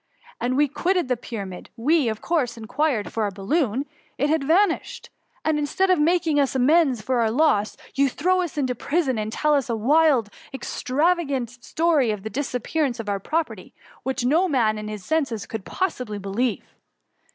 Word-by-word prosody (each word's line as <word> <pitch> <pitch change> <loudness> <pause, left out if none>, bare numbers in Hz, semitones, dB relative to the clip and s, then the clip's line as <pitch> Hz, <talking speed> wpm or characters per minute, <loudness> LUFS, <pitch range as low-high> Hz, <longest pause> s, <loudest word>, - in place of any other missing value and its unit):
When 250 +1 0
we 295 +2 +4
quitted 350 +2 0
the 250 - +2
Pyramid, 200 -6 -7
we, 290 +3 +2
of 220 -1 -4
course, 260 -9 0
inquired 240 0 -1
for 225 - -1
our 210 - +1
balloon— 230 - -1 0.3
it 290 +1 +1
had 315 -3 +1
vanished; 335 +5 +1 0.3
and 315 -1 +2
instead 370 +6 +1
of 365 - +3
making 320 -1 +2
us 275 -2 +1
amends 265 -3 +3
for 255 -2 0
our 225 -1 +2
loss, 220 -5 +2 0.2
you 275 +1 +3
throw 365 +8 +1
us 345 -4 -4
into 260 -3 0
prison 270 -1 0
and 215 0 -3
tell 300 +5 +1
us 275 -4 +1
a 230 - 0
wild, 265 -1 +3 0.2
extravagant 275 0 0
2$4 - - -15
THE 245 - -16 0.3
MUMMY. 320 -6 +4
storj - - +2
of 195 - -14
the 220 - -4
disuppearance 270 -1 -1
of 220 -2 -4
our 200 -1 -1
property, 315 - -3 0.3
which 265 -1 -2
no 325 +9 +3
man 220 -7 +2
in 210 - -6
his 210 -3 -7
senses 275 -10 -1
can 225 -1 -5
possibly 250 - -3
be^ 195 -1 -6
lieve." 240 +1 -1
265 Hz, 190 wpm, -24 LUFS, 225-315 Hz, 0.3 s, we